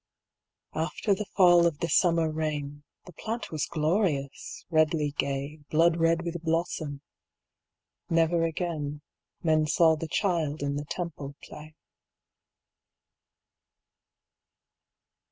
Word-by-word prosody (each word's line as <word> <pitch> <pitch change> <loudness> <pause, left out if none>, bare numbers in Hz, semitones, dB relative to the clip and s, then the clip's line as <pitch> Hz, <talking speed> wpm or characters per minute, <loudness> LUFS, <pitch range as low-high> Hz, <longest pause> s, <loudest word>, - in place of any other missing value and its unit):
After 165 +6 0
the 210 +1 -3
fall 175 -3 +7
of 160 -4 -2
the 170 - -2
summer 165 -1 +3
rain 150 -2 -3 0.2
The 180 - -12
plant 225 +7 -5
was 155 -3 -2
glorious, 155 -3 -1
redly 155 -2 +2
gay. 140 +2 -3
Blood 165 +2 +3
red 165 0 +2
with 170 -1 -4
blossom. 160 -3 -2 1.1
Never 165 0 +2
again 155 -3 -3 0.4
Men 155 -2 +3
saw 160 +2 +4
the 160 +1 -5
child 155 -5 0
in 140 0 -1
the 145 +1 -4
Temple 145 -4 -5
play. 155 +1 -11
160 Hz, 105 wpm, -28 LUFS, 150-170 Hz, 1.1 s, fall